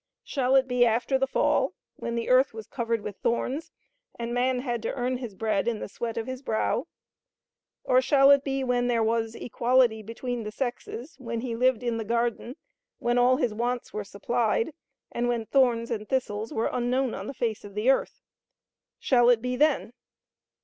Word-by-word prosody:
Shall 265 -1 +1
it 265 -1 +4
be 250 -1 +3
after 240 +3 +2
the 270 - +1
fall, - - +1 0.2
when 235 - -4
the 235 - -2
earth 255 -1 +4
was 220 -1 -7
covered 230 -2 -2
with 205 -1 -7
thorns, 255 +6 -2 0.5
and 235 0 -4
man 250 +1 +1
had 240 -3 -2
to 225 - -3
earn 250 0 -1
his 240 -6 -7
bread 215 -1 0
in 235 -2 0
the - - -5
sweat 230 +3 -5
of 225 - -2
his 260 0 -6
brow? 220 -5 -1 1.0
Or 255 0 +4
shall 275 +1 +5
it 280 -1 +5
be 270 -1 -1
when 245 -1 +1
there 235 -2 +2
was 225 0 0
equality 240 -2 +2
between 235 +3 -4
the 210 -1 -5
sexes, 250 +3 -5
when 235 -2 -4
he 240 -2 -3
lived 250 0 +2
in 235 -2 -1
the 225 - -3
garden, 235 +2 -1 0.4
when 240 +1 +1
all 250 +1 +4
his 245 -7 0
wants 240 +2 -2
were 210 - -3
supplied, 225 +6 -1 0.4
and 240 +1 -1
when 235 -2 -1
thorns 240 -2 +2
and 215 -2 -4
thistles 225 -5 -1
were 225 - -1
unknown 250 +1 0
on 195 - -6
the 275 - -6
face 225 -3 -2
of 205 -1 -11
the 220 +5 +4
earth? 270 - -2 0.7
Shall 245 -2 +4
it 240 -2 +5
be 250 +2 -2
then? 285 -4 +2
240 Hz, 190 wpm, -27 LUFS, 225-255 Hz, 1.0 s, shall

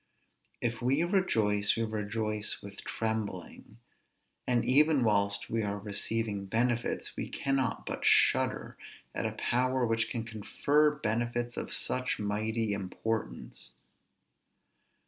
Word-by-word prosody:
If 115 -1 -1
we 135 +6 +2
rejoice, 110 - +2
we 115 - +1
rejoice 105 0 -2
with 100 0 -9
trembling; 110 -2 -4 0.7
and 120 -2 +2
even 145 +1 +4
whilst 100 -2 +1
we 115 - -1
are 100 -1 -2
receiving 105 0 -1
benefits, 120 +3 0
we - - -4
cannot 135 -3 -1
but - - -4
shudder - - +3 0.4
at - - -1
a - - -4
power 130 +1 +1
which 115 0 +1
can 115 - -3
confer 140 +7 +2
benefits 120 -3 -2
of - - -4
such 125 0 +1
mighty 105 +1 -1
importance. 100 - -4
115 Hz, 115 wpm, -30 LUFS, 105-125 Hz, 0.7 s, even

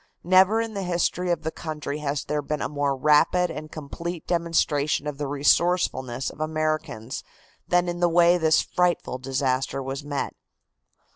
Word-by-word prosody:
Never 185 +5 +5
in 225 -1 -2
the 200 - -3
history 180 0 0
of 170 -2 0
the 160 - -2
country 150 -3 -5
has 145 -1 -2
there 150 0 -1
been 150 +1 -3
a - - 0
more 145 -1 -1
rapid 155 +5 +3
and 155 0 -7
complete 170 +3 -6
demonstration 160 -4 +1
of 145 -1 -5
the 145 - -2
resourcefulness 140 -3 +1
of - - -16
Americans 155 -6 -2 0.4
than 175 0 +2
in 175 0 -3
the 175 0 +3
way 175 +1 +5
this 160 -1 +3
frightful 175 -7 0
disaster 130 0 -1
was 135 +2 -5
met. 145 -1 -3
155 Hz, 160 wpm, -25 LUFS, 140-175 Hz, 0.4 s, Never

